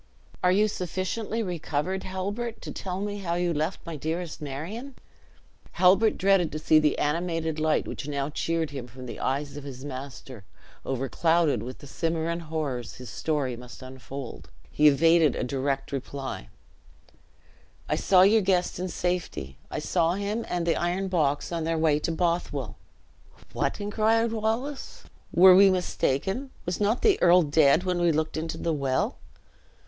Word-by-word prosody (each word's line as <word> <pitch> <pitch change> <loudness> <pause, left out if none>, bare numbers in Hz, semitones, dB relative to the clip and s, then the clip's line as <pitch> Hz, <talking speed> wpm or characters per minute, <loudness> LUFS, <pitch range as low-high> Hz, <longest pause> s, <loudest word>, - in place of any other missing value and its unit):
"Are 180 - +5
you 210 +3 +4
sufficiently 200 +4 -3
recovered, 175 0 -2
Halbert, 205 +5 -4
to - - -6
tell 185 0 -4
me 205 0 -3
how 170 -3 -2
you 175 -1 0
left 155 +5 -2
my 165 -1 -5
dearest 160 +3 -4
Marion." 180 - -6 0.8
Halbert 195 +4 +4
dreaded 195 -3 +3
to - - -2
see 155 0 +4
the 150 -1 +2
animated 160 0 -1
light 155 0 +1
which 145 - -6
now 140 0 -2
cheered 165 0 -1
him 135 -4 -6
from 130 +1 -11
the 120 - -7
eyes 140 +2 -2
of 145 - -7
his 135 -1 -8
master, 130 -4 -8 0.4
overclouded 145 +1 +1
with 125 +3 -7
the - - -13
Cimmerian 165 +3 -2
horrors 155 -7 -4
his 125 -4 -9
story 145 -4 -1
must 125 +2 -11
unfold; 130 0 -8 0.2
he 150 - +4
evaded 160 +1 +5
a - - -2
direct 135 +1 -2
reply; 135 - -5 1.4
"I - - +1
saw 185 -1 +5
your 215 +3 +5
guest 185 -3 +1
in 185 - -2
safety; 170 - -3
I - - -4
saw 165 +2 +1
him 205 +3 -3
and 175 -1 -1
the 170 - +2
iron 180 +3 -1
box 150 -5 0
on 165 -1 -2
their 165 0 0
way 155 -2 +3
to 165 - -2
Bothwell?" 165 - -1 0.8
"What!" - - -1
inquired 220 +2 +1
Wallace, 230 +6 -3 0.3
"were 185 +2 +8
we 195 +1 +8
mistaken? 185 - -1 0.2
was 175 0 -2
not 210 +4 +1
the 425 -4 +4
earl 175 0 +6
dead 150 +2 +4
when 180 -2 0
we 170 -1 +4
looked 155 0 -1
into 160 +1 -3
the 165 - -1
well?" 135 -3 -1
165 Hz, 160 wpm, -27 LUFS, 140-185 Hz, 1.4 s, were